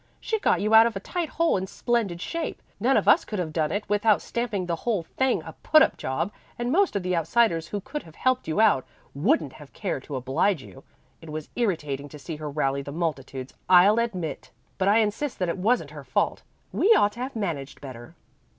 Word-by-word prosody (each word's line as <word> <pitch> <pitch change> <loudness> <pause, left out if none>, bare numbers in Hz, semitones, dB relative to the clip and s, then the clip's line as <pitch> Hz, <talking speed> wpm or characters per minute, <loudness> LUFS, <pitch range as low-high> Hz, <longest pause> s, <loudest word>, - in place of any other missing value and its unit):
She 440 - -2
got - - +2
you 215 +2 0
out 225 +1 +9
of 230 - -4
a - - -2
tight 340 - -3
hole 335 -8 +2
in 190 0 -3
splendid 210 -5 -1
shape. 335 - -4 0.2
None - - +3
of - - 0
us - - +6
could 210 - -5
have 165 -4 -3
done 155 -2 0
it 205 +3 -2
without 210 0 +3
stamping 220 -6 -3
the 170 -1 -2
whole 210 -2 -1
thing 260 +9 0
a - - -9
put 310 0 +6
up - - +1
job, 150 +9 -2 0.3
and 240 +1 -2
most 385 - +3
of 200 - -1
the 180 0 0
outsiders 170 -1 +2
who 205 - -4
could 295 +9 -5
have 160 -1 -16
helped 255 0 0
you 160 +5 -1
out, 210 -12 +4 0.3
wouldn't 140 0 +1
have 150 -2 -14
cared 135 - -3
to 145 - -6
oblige 135 +6 0
you. 135 - -13 0.4
It 165 - -11
was 155 0 -6
irritating 150 - -2
to 150 - -10
see 155 +2 -7
her 150 -1 -5
rallying 140 -1 -1
the 140 - -6
multitudes, 135 -5 -4 0.2
I'll 190 +5 +7
admit; 185 -11 -3 0.3
but 190 - +1
I 205 +2 +5
insist 225 +6 -2
that 180 -2 -1
it 170 - -2
wasn't 200 - +1
her 150 -2 -9
fault. 130 0 0 0.3
We 420 - +3
ought 205 - +4
to 220 - -13
have 255 +1 -4
managed 165 -11 -4
better." 120 -4 -10
185 Hz, 225 wpm, -26 LUFS, 150-225 Hz, 0.4 s, out